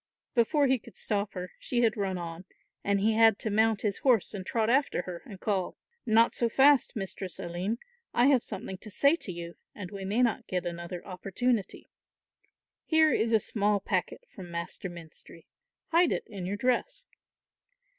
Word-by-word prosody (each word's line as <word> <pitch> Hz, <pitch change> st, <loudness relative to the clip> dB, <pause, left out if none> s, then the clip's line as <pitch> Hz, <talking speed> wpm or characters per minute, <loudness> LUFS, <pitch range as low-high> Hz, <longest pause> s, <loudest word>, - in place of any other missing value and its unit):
Before 280 Hz, +4 st, +3 dB
he 260 Hz, -1 st, +2 dB
could -, -, -15 dB
stop 205 Hz, -1 st, -1 dB
her 180 Hz, -2 st, -6 dB
she 240 Hz, -2 st, -1 dB
had 225 Hz, -2 st, +3 dB
run 195 Hz, -3 st, -1 dB
on, 170 Hz, +1 st, -7 dB, 0.4 s
and 200 Hz, -1 st, +1 dB
he 220 Hz, +2 st, +3 dB
had 225 Hz, -1 st, +5 dB
to 220 Hz, -, -3 dB
mount 220 Hz, 0 st, +2 dB
his 205 Hz, -2 st, -1 dB
horse 245 Hz, -8 st, +2 dB
and 195 Hz, -2 st, -5 dB
trot 220 Hz, +3 st, 0 dB
after 265 Hz, -6 st, +2 dB
her 175 Hz, -2 st, -7 dB
and 195 Hz, -3 st, -10 dB
call; 190 Hz, -4 st, -1 dB, 0.3 s
"Not 225 Hz, +1 st, +5 dB
so 235 Hz, -, +1 dB
fast, 275 Hz, +2 st, +4 dB
Mistress 195 Hz, -2 st, -5 dB
Aline, 185 Hz, +4 st, -3 dB, 0.3 s
I 240 Hz, -, +3 dB
have 270 Hz, -3 st, +4 dB
something 190 Hz, -2 st, -6 dB
to 215 Hz, -, -9 dB
say 280 Hz, -, +4 dB
to 200 Hz, -, -5 dB
you 170 Hz, 0 st, -8 dB, 0.2 s
and 185 Hz, -4 st, -7 dB
we 200 Hz, -1 st, -6 dB
may 210 Hz, +6 st, +1 dB
not 235 Hz, -3 st, 0 dB
get 180 Hz, -1 st, -2 dB
another 170 Hz, +1 st, -5 dB
opportunity. 200 Hz, +4 st, -2 dB, 1.0 s
Here 315 Hz, -1 st, +4 dB
is 225 Hz, +1 st, +1 dB
a 220 Hz, -, +5 dB
small 205 Hz, 0 st, 0 dB
packet 350 Hz, -, -2 dB
from 185 Hz, -, -11 dB
Master 170 Hz, +3 st, -5 dB
Menstrie. 165 Hz, -1 st, -12 dB, 0.4 s
Hide 335 Hz, +1 st, +4 dB
it -, -, -1 dB
in 190 Hz, -4 st, -6 dB
your 200 Hz, +2 st, -2 dB
dress." 255 Hz, -, 0 dB
205 Hz, 180 wpm, -29 LUFS, 185-235 Hz, 1.0 s, had